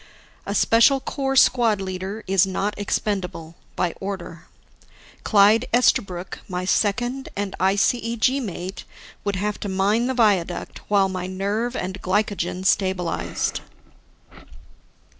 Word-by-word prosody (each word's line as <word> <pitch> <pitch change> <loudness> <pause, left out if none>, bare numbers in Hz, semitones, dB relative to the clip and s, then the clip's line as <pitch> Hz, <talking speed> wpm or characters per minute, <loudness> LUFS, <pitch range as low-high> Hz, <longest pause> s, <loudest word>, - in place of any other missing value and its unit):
A 200 - -2
Special 230 +6 +5
Corps 270 0 -2
squad 235 -5 +4
leader 190 +3 -5
is 195 0 +3
not 200 +2 -1
expendable 190 -5 -3 0.2
by 175 -2 0
order. 185 -4 -6 0.8
Clyde 215 +3 +4
Esterbrook, 190 -7 +1
my 180 0 -3
second 240 +7 0
and 200 -1 -3
ICEG 230 +6 +1
mate, 190 -4 -6 0.4
would 200 -1 -1
have 205 +2 -2
to 205 - -4
mine 205 +5 +1
the 260 - -1
viaduct 200 -7 +1
while 200 -2 +3
my 185 -1 -4
nerve 205 +6 -2
and 185 -2 -4
glycogen 185 -2 -1
stabilized. 185 -3 0
200 Hz, 115 wpm, -23 LUFS, 185-225 Hz, 0.8 s, Special